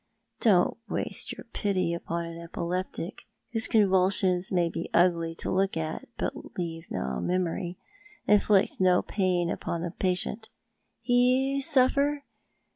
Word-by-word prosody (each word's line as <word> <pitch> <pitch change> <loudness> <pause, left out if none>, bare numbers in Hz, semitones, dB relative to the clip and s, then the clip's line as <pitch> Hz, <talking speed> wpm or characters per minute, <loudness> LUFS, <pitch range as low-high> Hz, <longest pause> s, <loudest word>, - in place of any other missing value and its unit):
Don't 195 -5 +3
waste - - -2
your - - -8
pity 185 -4 0
upon 170 0 -3
an 165 0 -8
epileptic, 175 +2 -4 0.3
whose 225 -1 +2
convulsions 190 -3 +2
may 175 -2 +2
be 165 0 -5
ugly 170 -2 +3
to - - -4
look 190 -1 +1
at, 160 0 -4
but - - -5
leave 165 -2 -4
no 65 -1 -3
memory, 180 0 -2 0.5
inflict 205 -1 +3
no 180 -1 +4
jiain 180 -4 0
vipon 170 0 -4
the 175 - -3
patient. 195 +5 -1 0.5
He 255 +3 +3
suffer? 280 +1 +3
185 Hz, 125 wpm, -28 LUFS, 170-210 Hz, 0.5 s, no